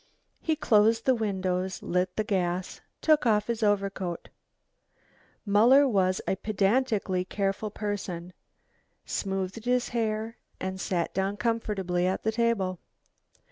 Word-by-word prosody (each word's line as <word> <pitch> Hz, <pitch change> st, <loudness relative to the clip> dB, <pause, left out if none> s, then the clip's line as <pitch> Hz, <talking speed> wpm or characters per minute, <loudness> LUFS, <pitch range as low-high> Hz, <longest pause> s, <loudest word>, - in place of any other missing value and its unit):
He 320 Hz, -, +1 dB
closed 225 Hz, -4 st, +3 dB
the 260 Hz, -, +5 dB
windows, 190 Hz, -4 st, -2 dB
lit 180 Hz, +1 st, 0 dB
the 215 Hz, -, 0 dB
gas, 180 Hz, -3 st, -2 dB, 0.2 s
took 305 Hz, -5 st, +4 dB
off 210 Hz, -2 st, +3 dB
his 235 Hz, -1 st, -3 dB
overcoat 195 Hz, -4 st, -1 dB, 1.2 s
Muller 240 Hz, +8 st, +6 dB
was 190 Hz, -5 st, +2 dB
a 190 Hz, -, 0 dB
pedantically 210 Hz, -2 st, +1 dB
careful 195 Hz, +2 st, -2 dB
person 190 Hz, -4 st, -4 dB, 0.7 s
smoothed 195 Hz, +3 st, -3 dB
his 250 Hz, 0 st, +1 dB
hair 225 Hz, -1 st, -2 dB, 0.2 s
and 190 Hz, 0 st, -4 dB
sat 175 Hz, -3 st, -1 dB
down 195 Hz, +2 st, -1 dB
comfortably 205 Hz, -5 st, 0 dB
at 190 Hz, -, -1 dB
the 220 Hz, -, +1 dB
table. 220 Hz, -6 st, 0 dB
205 Hz, 120 wpm, -28 LUFS, 185-225 Hz, 1.2 s, Muller